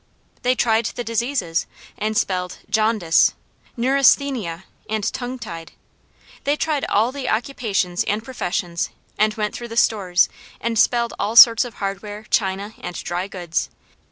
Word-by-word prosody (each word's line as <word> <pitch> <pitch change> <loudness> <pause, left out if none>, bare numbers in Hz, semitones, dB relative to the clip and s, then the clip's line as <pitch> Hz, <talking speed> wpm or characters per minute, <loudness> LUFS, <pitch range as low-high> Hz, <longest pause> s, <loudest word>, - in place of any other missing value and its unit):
They 250 +1 +2
tried 225 -2 +2
the 245 - -5
diseases 230 -7 -1 0.3
and 215 0 -2
spelled 180 -1 -1
jaundice, 215 -6 +3 0.4
neurasthenia, 255 - +2 0.3
and 215 -1 -1
tongue 250 +1 -4
tied. 170 -9 -8 0.7
They 285 +1 +2
tried 300 -2 -1
all 220 +4 +2
the 270 -2 -4
occupations 215 -7 -1
and 210 +2 -1
professions, 180 -8 -2 0.3
and 215 0 +3
went 210 -1 -2
through 240 - -6
the 230 0 -7
stores 190 -6 +3 0.3
and 230 -1 -1
spelled 235 0 +2
all 215 +3 -1
sorts 230 -1 +9
of 240 - -9
hardware, 205 +2 -5
china 200 +1 0
and 175 - -6
dry 180 +2 -3
goods. 175 -4 -3
215 Hz, 140 wpm, -21 LUFS, 190-240 Hz, 0.7 s, sorts